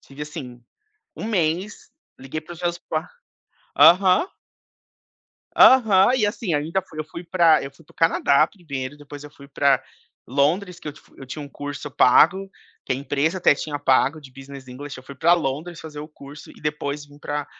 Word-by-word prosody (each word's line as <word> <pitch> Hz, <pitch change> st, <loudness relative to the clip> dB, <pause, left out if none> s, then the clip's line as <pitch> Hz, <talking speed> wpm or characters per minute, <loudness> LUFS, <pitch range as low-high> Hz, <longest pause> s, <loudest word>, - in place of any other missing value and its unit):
tive 140 Hz, +2 st, -11 dB
assim, 125 Hz, -5 st, -8 dB, 0.6 s
1 -, -, -8 dB
mês, 185 Hz, -1 st, -2 dB, 0.3 s
liguei 135 Hz, +4 st, -6 dB
para 175 Hz, +3 st, -11 dB
os 170 Hz, -, -13 dB
meus 175 Hz, 0 st, -1 dB
pais 160 Hz, -1 st, -4 dB, 0.7 s
aham. 185 Hz, -, +6 dB, 1.3 s
Aham, 225 Hz, -3 st, +6 dB
e 220 Hz, -, +2 dB
assim 205 Hz, -4 st, -2 dB
ainda 160 Hz, +6 st, -1 dB
fui 160 Hz, -4 st, -12 dB
eu -, -, -2 dB
fui 165 Hz, +3 st, -10 dB
para 170 Hz, -2 st, +4 dB
eu 135 Hz, -, -6 dB
fui 150 Hz, +4 st, -21 dB
para -, -, -22 dB
o -, -, -31 dB
Canadá 155 Hz, -2 st, +3 dB
1º 145 Hz, -8 st, -7 dB
depois 145 Hz, 0 st, -11 dB
eu 150 Hz, -, -10 dB
fui 140 Hz, -1 st, -16 dB
para 140 Hz, -2 st, +2 dB, 0.4 s
Londres 170 Hz, +7 st, 0 dB
que -, -, -9 dB
eu 145 Hz, -, -5 dB
te -, -, -18 dB
fu -, -, -26 dB
eu 135 Hz, -, -10 dB
tinha 145 Hz, +4 st, -7 dB
1 140 Hz, -, -10 dB
curso 145 Hz, 0 st, -7 dB
pago, 185 Hz, +11 st, +4 dB, 0.4 s
que 130 Hz, -, 0 dB
a -, -, -2 dB
empresa 145 Hz, +6 st, -1 dB
até 175 Hz, -, +4 dB
tinha 145 Hz, 0 st, -5 dB
pago 145 Hz, +2 st, +2 dB
de 130 Hz, -2 st, -14 dB
business 135 Hz, 0 st, -12 dB
english. 140 Hz, +3 st, -8 dB
Eu 130 Hz, -, -12 dB
fui 140 Hz, +1 st, -11 dB
para 170 Hz, +6 st, +4 dB
Londres 165 Hz, +2 st, -3 dB
fazer 150 Hz, -2 st, -9 dB
o 150 Hz, -, -7 dB
curso, 145 Hz, -1 st, -13 dB
e -, -, -19 dB
depois 150 Hz, -1 st, -3 dB
vim 145 Hz, 0 st, -18 dB
para 145 Hz, 0 st, -4 dB
150 Hz, 200 wpm, -22 LUFS, 140-175 Hz, 1.3 s, aham